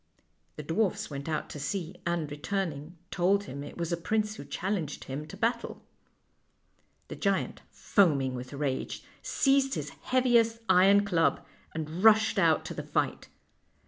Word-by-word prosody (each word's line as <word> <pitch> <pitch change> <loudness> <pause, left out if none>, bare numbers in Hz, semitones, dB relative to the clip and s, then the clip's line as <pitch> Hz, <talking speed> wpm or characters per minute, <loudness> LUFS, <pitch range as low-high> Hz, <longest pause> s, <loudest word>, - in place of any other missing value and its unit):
" - - -43
The 150 - -5
dwarfs 175 +3 -1
went 140 +2 -5
out 155 - -2
to 150 - -7
see, 175 +4 -3
and, 170 -4 -1
returning, 160 0 -3
told 195 +3 +2
him 140 -6 -7
it - - -9
was 170 -1 -3
a 170 - 0
prince 210 +4 0
who - - -9
challenged 180 -6 -3
him 145 +3 -6
to - - -10
battle. 235 +1 -1 1.3
The - - -5
giant, 195 -2 -1
foaming 145 -10 +2
with 125 0 -6
rage, 140 -2 -3 0.2
seized 270 -1 +2
his 150 -1 -4
heaviest 240 - +2
iron 200 +3 +6
club, 170 -5 +1 0.3
and 160 +3 -4
rushed 220 -1 +6
out 165 -4 +3
to - - -5
the - - -4
fight. - - -2
175 Hz, 155 wpm, -29 LUFS, 150-210 Hz, 1.3 s, iron